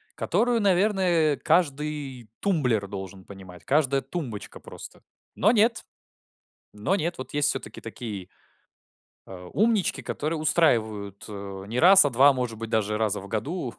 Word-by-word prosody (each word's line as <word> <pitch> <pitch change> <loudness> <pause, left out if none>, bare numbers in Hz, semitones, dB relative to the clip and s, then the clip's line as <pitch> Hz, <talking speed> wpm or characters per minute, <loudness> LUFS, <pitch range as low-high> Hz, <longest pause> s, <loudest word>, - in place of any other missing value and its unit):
которую, 235 -1 +1
наверное, 185 -6 +2
каждый 145 -6 -1
тумблер 125 - 0
должен 95 -1 -8
понимать, 95 -4 -12
каждая 140 -2 +2
тумбочка 130 - -7
просто. - - -12 0.3
Но 210 - +3
нет. 230 0 +2 0.9
Но 105 - -1
нет. 170 -2 -2
Вот 130 - -8
есть 145 0 +3
всё-таки - - -5
такие 105 -6 -7 1.0
э, 90 -1 -10
умнички, 210 -10 +1
которые 155 +5 -3
устраивают, 110 - 0
э, 100 -2 -8
не 120 +4 -2
раз, 190 +2 +8
а 145 - +2
2 135 +3 +5
может 125 -4 -3
быть, 115 0 -6
даже 105 -1 0
раза 105 -2 0
в 100 - -10
году 125 - -4
135 Hz, 140 wpm, -25 LUFS, 105-170 Hz, 1.0 s, раз